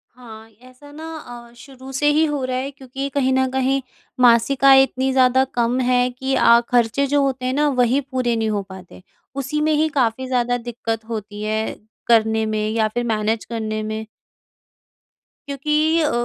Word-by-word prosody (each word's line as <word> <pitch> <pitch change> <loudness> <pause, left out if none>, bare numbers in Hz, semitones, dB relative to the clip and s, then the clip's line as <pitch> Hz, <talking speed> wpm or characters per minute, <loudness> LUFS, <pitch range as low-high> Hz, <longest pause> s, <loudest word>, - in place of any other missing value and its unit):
हाँ, 225 -3 -13
ऐसा 255 +3 -16
न - - -11
अ 245 -7 -9
शुरू 265 0 -12
से 295 - +2
ही 315 +1 +3
हो 290 -3 -2
रहा 255 0 -2
है 270 +2 -4
क्योंकि 270 0 -6
कहीं 265 -2 +1
न 260 0 +2
कहीं 265 +1 0 0.4
मासिक 250 +3 +3
आय 270 0 +8
इतनी 265 0 -1
ज़्यादा 260 0 +4
कम 240 +1 0
है 250 0 +2
कि 265 +2 -3
अ, 235 -2 +5
ख़र्चे 245 +3 +2
जो 285 +1 +2
होते 260 -2 -2
हैं 255 - 0
ना, 295 +1 +2
वही 255 +1 +2
पूरे 255 -3 -2
नहीं 220 -1 -1
हो 205 -1 -1
पाते। 185 -1 -12 0.3
उसी 275 +2 -2
में 310 +1 +1
ही 310 +1 +2
काफ़ी 260 -2 -1
ज़्यादा 245 -1 0
दिक्कत 230 -2 -5
होती 210 -2 -6
है, 215 +1 -2 0.3
करने 220 -1 +3
में 215 0 -2
या 220 0 +1
फिर 240 +3 -3
मैनेज़ 220 -1 -1
करने 215 -2 -3
में। 215 0 -5 1.4
क्योंकि 300 +3 +1
अ, 300 - +1
255 Hz, 180 wpm, -20 LUFS, 225-270 Hz, 1.4 s, आय